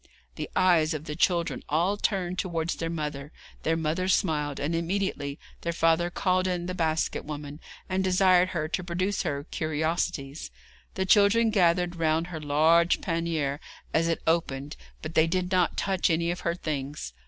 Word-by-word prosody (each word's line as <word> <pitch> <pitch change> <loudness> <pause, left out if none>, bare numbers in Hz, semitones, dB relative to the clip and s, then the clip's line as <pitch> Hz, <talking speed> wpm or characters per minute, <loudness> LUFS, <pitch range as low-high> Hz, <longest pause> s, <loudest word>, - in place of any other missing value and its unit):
The - - -6
eyes 165 -3 +3
of 150 - -5
the 150 - -5
children 170 0 +1
all 170 +7 +2
turned 185 -3 -1
towards 170 -3 -1
their 165 - -3
mother; 150 -3 -4 0.3
their 165 +1 +1
mother 165 +3 -1
smiled, 150 -6 +1
and 150 +4 -1
immediately 165 -5 -2 0.2
their 170 - -2
father 165 +1 +2
called 185 +1 +1
in 180 -1 -2
the 185 - -3
basket 160 -3 0
woman, 145 0 -7 0.3
and 190 0 0
desired 185 -1 +4
her 155 -4 -2
to 180 +3 -2
produce 185 +3 -1
her 140 -1 -2
curiosities. 155 -2 -2 0.5
The 190 - 0
children 210 +4 +5
gathered 175 -3 +2
round 160 +1 +1
her 160 - -5
large 160 +4 +4
pannier 165 -5 -1 0.3
as 165 +1 +2
it 165 - -1
opened, 145 -3 0 0.3
but 155 +1 -5
they 160 0 +4
did 180 +2 -1
not 180 -2 +2
touch 190 -2 +1
any 170 +1 +1
of 175 - -4
her 170 - -1
things. 145 - -4
165 Hz, 165 wpm, -27 LUFS, 155-180 Hz, 0.5 s, children